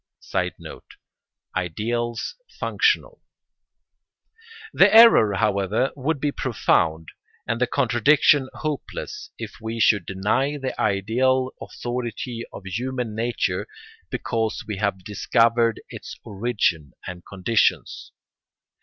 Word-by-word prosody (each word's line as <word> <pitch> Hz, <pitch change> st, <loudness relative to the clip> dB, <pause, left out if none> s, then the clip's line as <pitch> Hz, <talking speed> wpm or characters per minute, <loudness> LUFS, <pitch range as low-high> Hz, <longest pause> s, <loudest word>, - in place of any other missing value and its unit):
[Sidenote: -, -, -5 dB, 0.6 s
Ideals 115 Hz, +7 st, -2 dB, 0.3 s
functional.] 445 Hz, +2 st, +1 dB, 1.5 s
The -, -, +6 dB
error, 220 Hz, -, +7 dB
however, 100 Hz, +5 st, +1 dB
would 145 Hz, +2 st, -1 dB
be 145 Hz, +1 st, 0 dB
profound 80 Hz, -, 0 dB, 0.4 s
and 115 Hz, +1 st, -2 dB
the 125 Hz, -, +3 dB
contradiction 135 Hz, +2 st, +3 dB
hopeless 155 Hz, -2 st, -5 dB
if -, -, -8 dB
we 110 Hz, +1 st, -4 dB
should 105 Hz, -5 st, +3 dB
deny 110 Hz, +10 st, 0 dB
the 135 Hz, -2 st, -3 dB
ideal 120 Hz, +6 st, +1 dB
authority 120 Hz, -1 st, -5 dB
of 100 Hz, -, -10 dB
human 120 Hz, +3 st, -3 dB
nature 105 Hz, -4 st, -1 dB, 0.4 s
because 115 Hz, -1 st, -2 dB
we 105 Hz, -2 st, -4 dB
had 100 Hz, -2 st, -1 dB
discovered 115 Hz, +3 st, +2 dB
its -, -, -9 dB
origin 95 Hz, -, -1 dB
and 90 Hz, -1 st, -7 dB
conditions. 100 Hz, +3 st, 0 dB
115 Hz, 100 wpm, -23 LUFS, 100-130 Hz, 1.5 s, error